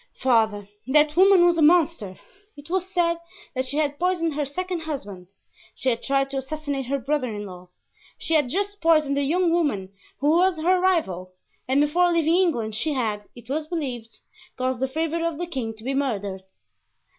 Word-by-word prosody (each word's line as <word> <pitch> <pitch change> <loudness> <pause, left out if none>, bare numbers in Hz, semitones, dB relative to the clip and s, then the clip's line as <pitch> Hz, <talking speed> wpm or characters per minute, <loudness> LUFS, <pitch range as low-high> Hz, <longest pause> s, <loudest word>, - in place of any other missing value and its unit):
"Father, 220 -5 +2 0.2
that 300 +2 +3
woman 375 -1 +6
was 345 -1 +3
a - - +3
monster. 305 - +3 0.4
It 290 +3 -12
was 375 0 -1
said 340 -2 +1 0.3
that 260 0 -2
she 280 +3 -4
had 290 -2 0
poisoned 345 -3 0
her 295 0 -1
second 360 +5 -4
husband; 205 - -6 0.5
she 260 - -1
had 230 -2 -1
tried 275 0 0
to 275 - -3
assassinate 275 -1 -4
her 280 +2 0
brother 275 +1 -1
in 210 -1 -5
law; 180 -2 -11 0.5
she 325 - -3
had 295 -5 +3
just 405 +5 -2
poisoned 310 -4 +3
a 280 - +1
young 340 +4 +2
woman 240 - 0 0.2
who 290 +3 +2
was 355 +1 +3
her 365 +3 +3
rival, 190 - 0 0.3
and 265 +2 +2
before 350 +4 +3
leaving 330 -1 +2
England 240 - +1
she 295 +8 -1
had, 215 -6 -2
it 240 -1 -14
was 305 +3 -2
believed, 255 -9 -5 0.4
caused 255 -1 -1
the 265 - 0
favorite 320 +4 -2
of 335 -2 -1
the 350 - -3
king 260 -9 -4
to 220 - -15
be 265 +3 -2
murdered." 205 -9 -2
290 Hz, 190 wpm, -24 LUFS, 245-335 Hz, 0.5 s, woman